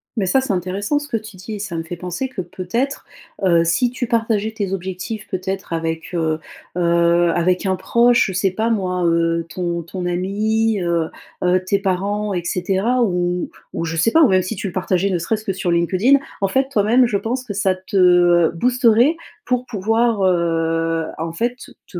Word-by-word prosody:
Mais 210 -5 0
ça, 190 +9 +3
c'est 260 -6 -1
intéressant 190 - -1
ce 290 0 -4
que 250 -5 -1
tu 215 -3 -10
dis, 195 +4 -7
et - - -7
ça 195 -4 -5
me 165 - -3
fait 165 +2 -6
penser 180 +9 -4
que 250 -7 -5
peut-être, 190 - -3 0.4
heu, 170 -2 +4
si 175 +9 +1
tu 250 -1 -3
partageais 220 -2 0
tes 200 -3 -3
objectifs, 190 +4 -5
peut-être 190 -1 -4
avec, 165 0 -3
heu 160 -2 0 0.4
heu, 170 0 +3
avec 180 +3 +1
un 190 - +2
proche, 235 +6 +3
je 190 - -4
sais 185 +1 +1
pas 220 +5 -1
moi, 185 -4 -1
heu, 165 0 +1
ton 170 -1 -3
ton 175 +2 -5
ami, 210 +4 0
heu 170 -2 0 0.3
heu, 180 +1 +2
tes 195 +2 +1
parents 200 +2 -1
et 175 -2 -2
cetera. 195 +8 0
Ou 180 -3 -1 0.2
ou 165 - -2
je 165 0 -3
sais 165 +8 +2
pas, 325 +4 +6
ou - - +7
même 185 -1 +4
si 185 +5 -4
tu 205 +2 -6
le 180 - -6
partageais 185 +1 0
ne 180 - 0
serait-ce 215 +6 -2
que 195 - -2
sur 190 -1 -3
LinkedIn. 185 +11 +3 0.2
En 195 - +3
fait 265 +6 +1
toi-même 240 +1 +3
je 210 -4 0
pense 250 +5 -3
que 205 - -6
ça 195 -2 +1
te, 185 +2 -9
heu, 175 -2 +5
boosterait 245 - +3 0.3
pour 250 0 -1
pouvoir, 225 0 +1
heu, 165 -2 +1
en 165 0 -3
fait, 240 +9 -3 0.2
te 175 - -7
190 Hz, 200 wpm, -20 LUFS, 175-225 Hz, 0.4 s, ou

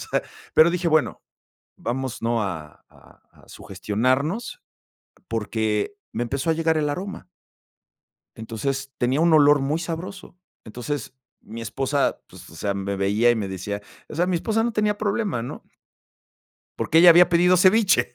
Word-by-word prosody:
O - - -10
sea, - - +1 0.3
pero 160 +2 +6
dije: 175 0 -1
"Bueno, 155 -2 +1 0.6
vamos, 130 0 -4
¿no? 115 -1 0
A 80 -6 -6
a - - -21
a - - -22
sugestionarnos" 130 - -2 0.7
porque 110 - -2 0.2
me 115 - -3
empezó 135 +6 -2
a - - +3
llegar 160 0 +1
el 150 -1 0
aroma. 185 +5 -6 1.1
Entonces, 135 +5 -4
tenía 130 +4 +1
un 170 0 +4
olor 145 -1 +6
muy 140 +4 -1
sabroso. 175 +3 -7 0.3
Entonces, 125 +5 -5 0.3
mi 115 +2 -9
esposa, 135 +5 -1
pues, - - -14
o - - -15
sea, 100 - -2
me 100 0 -3
veía 100 +5 +2
y - - +3
me 105 -3 -3
decía 100 +2 -5 0.3
o - - -9
sea, 175 +3 +1
mi 180 -1 0
esposa 220 +6 0
no 235 - -1
tenía 210 -1 0
problema, 205 - -1
¿no? 120 - -8 1.2
Porque 160 - +2
ella 175 +1 +9
había 175 +1 +7
pedido 175 +1 +4
ceviche. 190 - +3
140 Hz, 160 wpm, -23 LUFS, 115-175 Hz, 1.2 s, ella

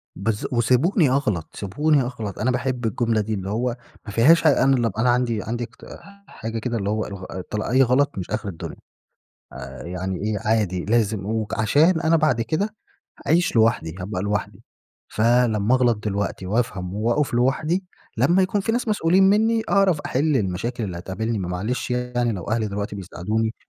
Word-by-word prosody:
بالضب 105 +4 -2
وسبوني 130 - +3
أغلط، 105 - 0
سبوني 145 +9 +1
أغلط. 115 -6 -5
أنا 125 +4 +1
باحب 125 -1 -2
الجملة 115 0 +1
دي، 110 +1 -3
اللي 95 -2 -4
هو 120 +3 -1 0.3
ما 105 - -6
فيهاش 140 +11 +5
حاجة. - - +4
أنا 135 0 +4
لما 120 -2 +1
أبقى 110 +1 -3
أنا 125 - +3
عندي 120 -3 +1
عندي 120 +2 -3
اق 120 - -11 0.3
حاجة 115 0 -5
كده، 120 +1 -2
اللي 100 -2 -2
هو 110 +1 -1
الغ 100 -2 -8 0.5
أي 130 +2 +4
غلط 130 0 +2
مش 90 - -5
آخر 105 0 -3
الدنيا، 85 - -7 0.8
آآ 65 -1 -8
يعني 90 +1 -4
إيه 105 0 -1
عادي، 105 -4 0
لازم. 110 -2 +1
وعشان 110 - +2
أنا 165 0 +3
بعد 155 -8 +2
كده 195 - -2 0.5
هاعيش 170 -3 +2
لوحدي، 110 -8 +2
هابقى 90 0 -4
لوحدي، 100 0 -3 0.5
فلمّا 115 0 +3
أغلط 120 -3 +2
دلوقتي 100 -2 -2
وأفهم 95 -3 -2
وأقف 120 +7 0
لوحدي، 145 +9 +1 0.3
لما 180 +3 +4
يكون 195 +2 +1
في 225 - -1
ناس 240 +1 -1
مسؤولين 190 -3 +3
مني، 225 +2 +3
أعرف 190 -6 +3
أحل 145 +2 +1
المشاكل 110 +5 -2
اللي 90 -4 -4
هتقابلني. 105 +5 -3
ما 90 - -3
معلش 105 +8 -3
يعني، 125 -1 -1
لو 90 -4 -5
أهلي 110 -1 0
دلوقتي 100 0 -4
بيساعدوني 105 +4 -2
115 Hz, 170 wpm, -23 LUFS, 100-130 Hz, 0.8 s, فيهاش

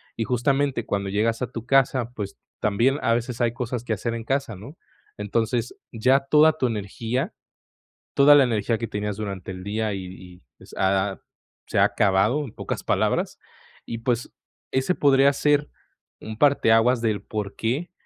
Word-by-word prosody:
Y 115 - -1
justamente 135 +1 0
cuando 100 -1 -2
llegas 110 +4 0
a 125 - -4
tu 115 -1 -7
casa, 130 -3 +2
pues, 100 -2 -6 0.2
también 115 +7 +2
a 115 - +3
veces 120 +1 -3
hay 120 -1 +1
cosas 120 -1 -4
que 115 - -2
hacer 115 +3 -3
en 115 - -5
casa, 135 -3 -2
¿no? 125 - -12 0.4
Entonces, 115 +3 -1 0.2
ya 130 +4 +3
toda 150 +3 +4
tu 130 - 0
energía, 115 - -3 0.8
toda 145 +1 +7
la 140 - +7
energía 115 -1 0
que 115 - -4
tenías 105 0 -3
durante 100 -3 -5
el 90 0 -8
día, 105 +1 -2
y 95 - -4
y 90 -1 -13 0.2
s - - -14
ha 95 +1 +1
ha - - -16 0.5
se - - 0
ha - - +6
acabado, 105 +9 +2
en 115 - -9
pocas - - -5
palabras. - - 0 0.5
Y, 115 - -4
pues, 120 0 -1 0.4
ese 130 +7 +1
podría 140 -2 +4
ser 145 +1 +2 0.5
un 110 0 -7
parteaguas 120 -3 +4
del 105 -3 -1
porqué, 110 - -3
115 Hz, 170 wpm, -24 LUFS, 105-135 Hz, 0.8 s, toda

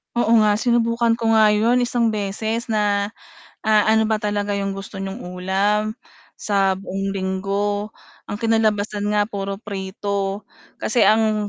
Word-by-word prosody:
Oo 235 -2 +1
nga 210 -1 +4
sinubukan 230 0 +1
ko 225 -1 +2
nga 215 -1 +6
'yon 230 +4 +3
1 235 -2 +1
beses 220 +3 -3
na, 205 -1 +1 0.5
ah, 215 -1 +3
ano 220 0 +4
ba 220 -1 0
talaga 205 -1 -1
'yong 195 -1 -2
gusto 195 0 -8
niyong 195 +5 -6
ulam, 195 +4 -1 0.4
sa 195 -2 +1
buong 195 0 -4
linggo, 200 +2 -1 0.4
ang - - -3
kinalabasan 215 -2 +1
nga 210 0 +2
puro 200 -2 -4
prito, 200 0 -4 0.3
kasi 235 +2 0
ang 215 0 +3
210 Hz, 140 wpm, -21 LUFS, 195-220 Hz, 0.5 s, nga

